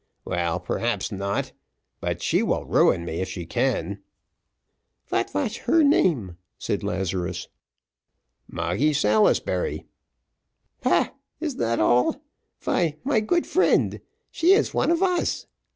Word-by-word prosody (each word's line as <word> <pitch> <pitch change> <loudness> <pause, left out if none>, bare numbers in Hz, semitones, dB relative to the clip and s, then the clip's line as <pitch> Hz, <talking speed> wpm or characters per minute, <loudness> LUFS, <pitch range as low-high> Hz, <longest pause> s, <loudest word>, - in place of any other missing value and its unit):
"Well, 85 -1 -1
perhaps 115 -1 -2
not; 100 0 -2 0.5
but - - -3
she - - +2
will - - 0
ruin 85 - +3
me 85 0 -3
if 95 - -3
she 90 -2 -6
can." - - -1 1.1
"Vat - - -1
vash 210 - -2
her 320 +6 +5
name?" 140 - +2 0.2
said - - -2
Lazarus. 90 -1 -3 1.0
"Moggy 90 - 0
Salisbury." 215 - +1 1.0
"Paah! - - +2 0.3
is 310 -3 -2
dat 115 - -1
all? 120 +3 +3 0.4
vy, 165 -4 0
my 260 -4 +2
good 345 +11 +1
friend, 375 - +2 0.3
she 345 +4 +4
is 425 - +2
one - - +1
of 340 +2 +2
us. 360 -2 0
120 Hz, 120 wpm, -24 LUFS, -, 1.1 s, her